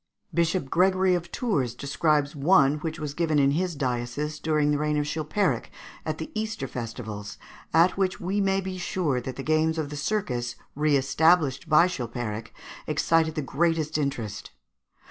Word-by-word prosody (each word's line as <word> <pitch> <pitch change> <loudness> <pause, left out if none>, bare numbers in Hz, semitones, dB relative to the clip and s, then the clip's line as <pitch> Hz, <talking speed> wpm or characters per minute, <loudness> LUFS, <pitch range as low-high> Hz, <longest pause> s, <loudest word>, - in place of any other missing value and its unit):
Bishop 170 -3 0
Gregory 185 +1 +3
of 175 -1 -2
Tours 145 - -1
describes 145 +1 0
one 145 -1 +4
which 160 0 -4
was 150 -2 -4
given 160 -1 +1
in 140 -1 +4
his 175 +3 -1
diocese 135 +3 -2
during 150 -2 +1
the 145 - +1
reign 150 0 0
of 145 - 0
Chilpéric, 155 +6 0 0.4
at - - -2
the - - -6
Easter 215 -10 -3
festivals, 110 -4 -6 0.3
at 170 +4 +4
which 190 -1 0
we 195 +3 -1
may 195 0 +2
be 190 -1 -5
sure 160 -8 -1
that 130 +1 -6
the 135 - -6
games 155 +2 +2
of 150 -2 -3
the - - -5
circus, 140 - -2 0.2
re 150 0 +2
established 155 +2 +2
by 155 +3 +7
Chilpéric, 120 -9 -4 0.4
excited 160 -1 +2
the 155 - -2
greatest 155 +2 0
interest. 120 -9 -2
150 Hz, 165 wpm, -26 LUFS, 135-170 Hz, 0.4 s, by